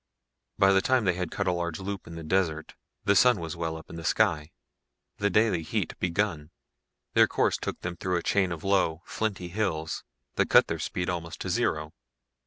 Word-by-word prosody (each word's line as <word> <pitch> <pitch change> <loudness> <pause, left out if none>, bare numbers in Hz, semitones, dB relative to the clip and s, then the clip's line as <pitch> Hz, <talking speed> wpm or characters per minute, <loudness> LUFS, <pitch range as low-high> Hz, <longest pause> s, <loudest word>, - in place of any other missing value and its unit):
By 95 0 +5
the 95 - +4
time 130 0 +2
they 90 - +3
had 90 -1 -3
cut 100 - -2
a 90 - +2
large 85 -2 -2
loop 95 0 -5
in 85 - -8
the 80 - -7
desert 80 -2 0 0.3
the 100 - +4
sun 125 0 +5
was 80 -1 -5
well 80 -1 -3
up 80 - -12
in 85 - -9
the 85 - -7
sky, 75 -1 +1 0.7
the 100 - +2
daily 105 -3 +3
heat 80 - -2
begun. 85 -4 -1 0.6
Their - - +6
course - - +1
took - - -5
them 85 0 -4
through 90 +1 -1
a 85 - -3
chain 95 -3 +2
of 80 -2 -5
low, 95 -4 +1
flinty 100 -5 -3
hills 85 -5 -2 0.3
that - - +2
cut - - +7
their - - -3
speed 90 -1 -3
almost 85 -1 -4
to - - -3
zero. 75 +1 0
90 Hz, 200 wpm, -28 LUFS, 80-95 Hz, 0.7 s, cut